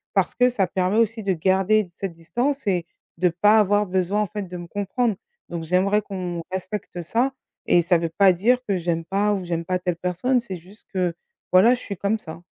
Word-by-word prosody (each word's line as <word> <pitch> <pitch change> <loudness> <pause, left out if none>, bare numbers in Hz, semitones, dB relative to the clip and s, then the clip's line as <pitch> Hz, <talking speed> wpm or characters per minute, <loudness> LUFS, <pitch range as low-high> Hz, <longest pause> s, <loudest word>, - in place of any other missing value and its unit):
parce - - +2
que 250 0 +4
ça 210 -6 +1
permet 185 +3 0
aussi 225 0 +2
de 195 - +1
garder 190 +4 +2
cette 195 -3 -4
distance 245 - -2
et 180 -3 +1 0.3
de 180 0 +4
pas 210 +6 +4
avoir 205 0 +3
besoin 190 +2 0
en 210 - 0
fait 210 +1 -5
de 180 -1 -7
me 175 - -7
comprendre. 205 +5 -1 0.3
Donc 170 -1 -4
j'aimerais 190 +5 +2
qu'on 180 -4 -5
respecte 190 -1 -5
ça 240 +10 +1 0.4
et 175 - +5
ça 175 +1 +3
veut 165 - -2
pas 195 -2 +6
dire 225 +8 +3
que 200 - +1
j'aime 165 -1 -2
pas 205 +2 +1
ou 190 -3 -3
j'aime 170 -1 -2
pas 185 +2 0
telle 180 -1 -1
personne, 180 +9 0
c'est 195 -6 -6
juste 185 +6 -18
que, 180 -2 0 0.4
voilà, 215 +7 +7
je 245 - -10
suis 200 -5 -6
comme 200 +4 0
ça. 160 -4 -9
190 Hz, 215 wpm, -23 LUFS, 175-210 Hz, 0.4 s, voilà